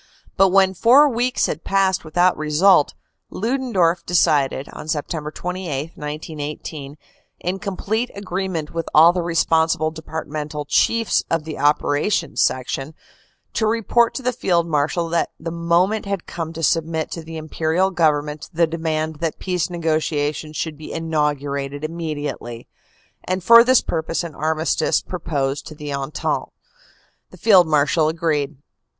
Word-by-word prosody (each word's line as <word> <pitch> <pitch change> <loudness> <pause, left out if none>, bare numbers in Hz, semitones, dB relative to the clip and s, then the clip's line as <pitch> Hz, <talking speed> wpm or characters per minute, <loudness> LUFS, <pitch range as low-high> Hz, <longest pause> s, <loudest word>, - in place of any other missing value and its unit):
But 195 0 +5
when 190 0 +4
four 250 +10 +6
weeks 250 -1 0
had 155 - -4
passed 195 -1 +1
without 175 +3 +2
result, 155 +2 +3 0.3
Ludendorff 200 -8 0
decided, 145 -6 +2
on - - -9
September 155 0 -3
28, 170 -4 -4
1918, 150 -1 -6 0.4
in 185 +2 -2
complete 210 +5 -2
agreement 185 -5 -4
with 165 -1 -3
all 165 +3 +8
the 180 - -1
responsible 160 -1 +1
depart 160 0 -6
mental 150 0 -5
chiefs 230 +9 +2
of 165 -2 0
the 155 -2 -7
Operation 150 +3 +1
Section, 135 +3 -1 0.6
to 220 - +1
report 230 +1 +2
to 265 - -4
the 250 +1 0
Field 175 -7 +1
Marshal 165 +2 0
that 170 0 0
the 165 +1 -5
moment 170 +5 +1
had 200 -3 -3
come 165 -2 -5
to 165 0 -6
submit 160 0 0
to 165 - -5
the 160 0 -8
Imperial 160 +4 0
Government 150 -3 0
the 170 -1 +3
demand 160 -1 -2
that 165 0 -3
peace 180 -3 -2
negotiations 155 -2 -1
should 155 -2 -4
be 155 - -8
inaugurated 145 -3 -2
immediately, 150 -7 -5 0.6
and 185 0 -2
for 230 +4 +9
this 255 0 +4
purpose 165 +1 -2
an 170 -2 -6
armistice 160 +2 0
proposed 145 -5 -3
to 155 - -9
the 150 -1 -6
Entente. 140 +2 -2 0.8
The - - -15
Field 190 -6 +5
Marshal 150 +1 +2
agreed. 155 -3 -1
160 Hz, 140 wpm, -21 LUFS, 150-180 Hz, 0.8 s, for